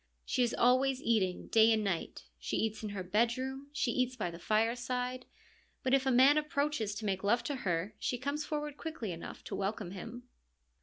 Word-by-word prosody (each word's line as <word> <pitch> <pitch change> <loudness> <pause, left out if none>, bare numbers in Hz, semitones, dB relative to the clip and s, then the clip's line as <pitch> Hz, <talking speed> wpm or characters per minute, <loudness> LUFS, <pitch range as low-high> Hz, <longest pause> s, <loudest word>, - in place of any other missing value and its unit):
She - - 0
is 240 -1 +2
always 255 +2 +3
eating, 210 -8 +1
day 225 0 +6
and 220 -1 +2
night; 175 - -2 0.2
she - - -2
eats 220 -1 -1
in 215 - -4
her 200 -2 -4
bedroom, 250 +8 0
she 280 -4 0
eats 255 +1 0
by 210 -8 -2
the 170 - -9
fireside. 245 +4 0 0.6
But 260 - +1
if 270 0 +3
a - - +4
man 265 +4 +6
approaches 285 -8 -1
to 215 +1 -5
make 195 -1 -1
love 235 +4 +2
to 280 +3 -2
her, 185 -2 -1
she 245 - -1
comes 280 +4 -2
forward 295 -1 -3
quickly 315 - -4
enough 165 -1 -8
to - - -5
welcome 200 -1 -2
him. 230 +6 -7
235 Hz, 195 wpm, -33 LUFS, 205-265 Hz, 0.6 s, day